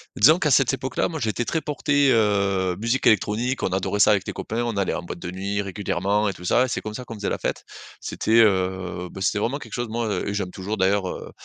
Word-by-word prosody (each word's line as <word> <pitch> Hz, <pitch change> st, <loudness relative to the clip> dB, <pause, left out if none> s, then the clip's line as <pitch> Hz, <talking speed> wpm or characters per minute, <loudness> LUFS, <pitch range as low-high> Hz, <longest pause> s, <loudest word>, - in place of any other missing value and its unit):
Disons 155 Hz, +10 st, +6 dB
qu'à 150 Hz, -6 st, +1 dB
cette 135 Hz, -1 st, +4 dB
époque-là, 130 Hz, 0 st, -1 dB
moi, 160 Hz, -2 st, -5 dB
j'étais 115 Hz, 0 st, -1 dB
très 160 Hz, -, -1 dB
porté, 145 Hz, -2 st, +2 dB
heu, 100 Hz, -4 st, +2 dB
musique 115 Hz, +4 st, +1 dB
électronique. 115 Hz, +4 st, +1 dB
On -, -, +1 dB
adorait 95 Hz, +2 st, -1 dB
ça 105 Hz, -, +6 dB
avec 100 Hz, -2 st, +2 dB
les -, -, -3 dB
copains. 115 Hz, +2 st, -3 dB
On 115 Hz, -4 st, -2 dB
allait 100 Hz, -, 0 dB
en -, -, -3 dB
boîte 85 Hz, -, -7 dB
de 90 Hz, -, -6 dB
nuit 100 Hz, +2 st, -2 dB
régulièrement 100 Hz, +1 st, -1 dB
et -, -, -3 dB
tout 90 Hz, -, -11 dB
ça 125 Hz, +7 st, +3 dB
et -, -, -4 dB
c'est -, -, -3 dB
comme 105 Hz, 0 st, -6 dB
ça 125 Hz, -, -6 dB
qu'on 115 Hz, -, -8 dB
faisait 100 Hz, -1 st, -3 dB
la -, -, -1 dB
fête. -, -, -3 dB, 0.4 s
C'était, 115 Hz, +1 st, +1 dB
heu, 95 Hz, -3 st, 0 dB
bah, 95 Hz, -, -9 dB
c'était 100 Hz, +2 st, +1 dB
vraiment 130 Hz, +6 st, -1 dB
quelque -, -, -11 dB
chose, 120 Hz, -1 st, -2 dB
moi 115 Hz, -2 st, -1 dB
et 100 Hz, -, -2 dB
j'aime 95 Hz, -3 st, -3 dB
toujours, 100 Hz, +3 st, -4 dB
d'ailleurs, 95 Hz, 0 st, +2 dB
heu, -, -, -7 dB
105 Hz, 250 wpm, -23 LUFS, 95-120 Hz, 0.4 s, Disons